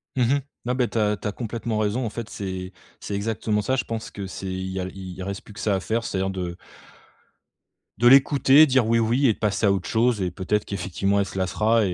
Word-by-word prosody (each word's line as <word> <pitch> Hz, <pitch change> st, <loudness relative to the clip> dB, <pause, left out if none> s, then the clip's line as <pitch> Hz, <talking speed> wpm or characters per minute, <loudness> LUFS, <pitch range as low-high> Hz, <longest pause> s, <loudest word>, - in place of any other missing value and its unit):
Mmh 125 Hz, -2 st, +3 dB
mh. 140 Hz, -, -1 dB, 0.2 s
Non, 125 Hz, +1 st, 0 dB
beh, 125 Hz, -2 st, +1 dB
tu -, -, -5 dB
as 105 Hz, -1 st, +2 dB
tu 100 Hz, -, -5 dB
as 105 Hz, -, -1 dB
complètement 115 Hz, 0 st, -4 dB
raison 110 Hz, +4 st, 0 dB
en 110 Hz, -, -1 dB
fait, 115 Hz, 0 st, -6 dB
c'est 95 Hz, -1 st, -5 dB, 0.3 s
c'est 100 Hz, -, -5 dB
exactement 105 Hz, 0 st, -1 dB
ça. 130 Hz, +6 st, 0 dB
Je 130 Hz, -, 0 dB
pense 115 Hz, -1 st, -5 dB
que 100 Hz, -2 st, -6 dB
c'est 95 Hz, -, -7 dB
il 95 Hz, 0 st, -3 dB
y 95 Hz, -, -3 dB
a 90 Hz, -, -2 dB
il 95 Hz, -1 st, -8 dB
reste 100 Hz, +3 st, -5 dB
plus 105 Hz, -, -13 dB
que 110 Hz, -, -11 dB
ça 105 Hz, -2 st, +1 dB
à -, -, 0 dB
faire, 115 Hz, +4 st, -1 dB
c'est-à-dire 95 Hz, 0 st, -1 dB
de 90 Hz, -2 st, -4 dB, 1.4 s
de 120 Hz, -, +5 dB
l'écouter, 140 Hz, +2 st, +7 dB
dire 130 Hz, -5 st, +2 dB
oui, 115 Hz, 0 st, +3 dB
oui 120 Hz, +5 st, +2 dB
et 110 Hz, -, +4 dB
de -, -, -17 dB
passer 105 Hz, 0 st, +1 dB
à 100 Hz, -, +5 dB
autre 95 Hz, -2 st, -1 dB
chose 115 Hz, -1 st, +2 dB
et 90 Hz, -, -1 dB
peut-être 100 Hz, +4 st, -1 dB
qu'effectivement 100 Hz, +1 st, -1 dB
elle 100 Hz, -, 0 dB
se 95 Hz, -, -8 dB
lassera 105 Hz, +4 st, +2 dB
et, 90 Hz, -, -1 dB
105 Hz, 250 wpm, -24 LUFS, 95-115 Hz, 1.4 s, l'écouter